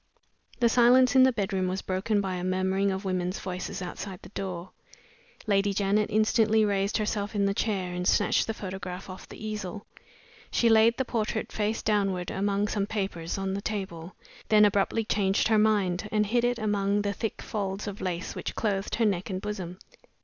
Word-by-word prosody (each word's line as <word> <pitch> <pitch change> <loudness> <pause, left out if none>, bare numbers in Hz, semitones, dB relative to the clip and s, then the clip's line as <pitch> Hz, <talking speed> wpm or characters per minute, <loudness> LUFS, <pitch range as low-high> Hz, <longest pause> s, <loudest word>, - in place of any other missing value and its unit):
The 240 - +4
silence 250 +2 +5
in 260 - +8
the 260 0 +6
bedroom 195 -4 -1
was 185 +1 -3
broken 200 +3 0
by 190 -2 -2
a 180 -1 -4
murmuring 190 +2 +1
of 190 +1 -3
women's 185 -1 -1
voices 180 0 -5
outside 185 +1 -6
the - - -11
door. 185 -3 -5 0.7
Lady 200 -1 +2
Janet 205 +1 +1
instantly 220 0 +3
raised 200 0 0
herself 210 0 -2
in 200 -1 +2
the 200 - +1
chair 195 -4 -1
and 180 0 -2
snatched 205 - +3
the 225 - -1
photograph 185 -1 -6
off 185 - -11
the - - -10
easel. 210 -2 -5 0.6
She 235 - +2
laid 225 +1 +5
the 265 - 0
portrait 220 -2 -2
face 215 +1 -1
downward, 195 -4 0
among 200 +1 0
some 205 -1 -1
papers 190 -6 -3
on 195 0 -2
the 200 - -3
table, 190 -5 -5 0.3
then 210 -1 +7
abruptly 205 +2 +1
changed 200 0 +1
her 220 -1 +4
mind, 210 -2 +1
and 210 -1 +2
hid 235 +3 +1
it 245 0 +1
among 205 -2 0
the 200 0 -1
thick 225 +1 -4
folds 195 -1 -3
of 200 0 -6
lace 180 -1 -3
which - - -5
clothed 200 -3 -1
her 230 - +2
neck 195 -2 0
and 185 -1 -2
bosom. 190 -3 -5
200 Hz, 185 wpm, -27 LUFS, 190-215 Hz, 0.7 s, in